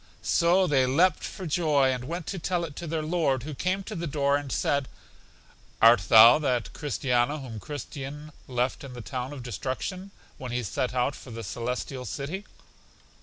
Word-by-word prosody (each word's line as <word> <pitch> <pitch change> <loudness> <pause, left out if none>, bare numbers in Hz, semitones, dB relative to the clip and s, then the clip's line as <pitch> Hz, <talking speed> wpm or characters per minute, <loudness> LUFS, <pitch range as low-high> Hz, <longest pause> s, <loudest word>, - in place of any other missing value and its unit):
So 175 +2 +3
they 135 -6 +3
leapt 170 +8 +3
for 185 - -6
joy, 150 -4 +2
and 125 -1 -5
went 170 +3 -4
to 190 - -4
tell 170 +1 -1
it 150 -4 -9
to 170 - -5
their 160 0 -2
Lord, 155 -6 0
who 150 +1 -6
came 185 +7 -1
to 215 - -7
the 170 -3 -3
door 140 -1 +1
and 145 -2 -3
said, 140 -2 0 0.9
Art 115 -5 +6
thou 115 +5 +9
that 125 -6 -1
Christiana 135 -1 0
whom 125 -6 -7
Christian 145 +2 -7 0.2
left 125 +1 -1
in 135 -2 -8
the 120 - -7
town 125 +2 -5
of 140 -4 -7
Destruction, 130 - -4 0.3
when 130 -2 -6
he 120 0 -1
set 125 +5 -2
out 125 +2 +1
for - - -12
The 115 -1 -7
Celestial 125 +5 -4
City? 165 +11 -5
140 Hz, 180 wpm, -27 LUFS, 125-160 Hz, 0.9 s, thou